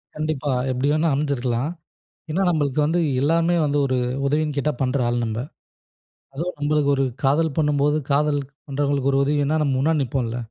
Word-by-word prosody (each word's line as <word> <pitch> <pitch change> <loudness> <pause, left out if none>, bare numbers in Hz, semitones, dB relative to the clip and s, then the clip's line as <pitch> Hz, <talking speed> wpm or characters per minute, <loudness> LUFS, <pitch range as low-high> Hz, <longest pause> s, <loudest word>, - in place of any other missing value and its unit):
கண்டிப்பா. 155 -2 -2 0.2
எப்டி 130 +2 -1
வேணா 155 +2 +2
அமைஞ்சிருக்கலாம். 135 -1 -1 0.6
ஏன்னா 180 +5 0
நம்மளுக்கு 150 -4 0
வந்து 165 +4 +1 0.2
எல்லாருமே 165 +4 +2
வந்து 145 0 0
ஒரு 130 -1 0 0.3
உதவின்னு 150 +1 0
கேட்டா 150 +2 0
பண்ற 130 +1 +1
ஆள் 120 0 0
நம்ப. 110 0 -3 1.0
அதுவும் 170 +6 -4
நம்மளுக்கு 145 -1 +1
ஒரு 135 - +2 0.2
காதல் 145 +2 +2
பண்ணும்போது, 150 -1 +2 0.2
காதல் 145 0 +2 0.3
பண்றவங்களுக்கு 140 -1 0
ஒரு 135 - +3
உதவின்னா 145 +2 +1
நம்ம 140 -3 +1
முன்னாடி 155 +2 +2
நிப்போம்ல. 125 -2 -2
145 Hz, 155 wpm, -22 LUFS, 135-155 Hz, 1.0 s, ஒரு